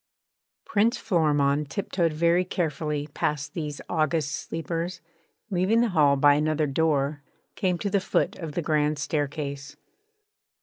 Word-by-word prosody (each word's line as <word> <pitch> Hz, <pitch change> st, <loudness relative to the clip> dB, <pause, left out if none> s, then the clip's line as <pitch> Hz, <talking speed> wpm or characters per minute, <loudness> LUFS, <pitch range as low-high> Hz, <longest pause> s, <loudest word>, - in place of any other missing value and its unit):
Prince 225 Hz, +4 st, +2 dB
Florimond 150 Hz, -6 st, +1 dB
tiptoed 175 Hz, 0 st, -1 dB
very 170 Hz, +3 st, +2 dB
carefully 150 Hz, -4 st, -2 dB
past 150 Hz, 0 st, -2 dB
these 150 Hz, -3 st, -4 dB
august 155 Hz, -2 st, 0 dB
sleepers 165 Hz, +3 st, -4 dB, 0.5 s
and, -, -, -1 dB
leaving 215 Hz, +6 st, +3 dB
the 240 Hz, -, +2 dB
hall 150 Hz, -6 st, +4 dB
by 145 Hz, +1 st, +5 dB
another 155 Hz, +1 st, +1 dB
door, 145 Hz, 0 st, 0 dB, 0.3 s
came 180 Hz, -2 st, 0 dB
to 200 Hz, -, -2 dB
the 200 Hz, -, +3 dB
foot 190 Hz, -, 0 dB
of 160 Hz, -4 st, -6 dB
the 175 Hz, -, -2 dB
grand 150 Hz, -1 st, +1 dB
staircase. 145 Hz, -1 st, -3 dB
155 Hz, 135 wpm, -26 LUFS, 145-175 Hz, 0.5 s, by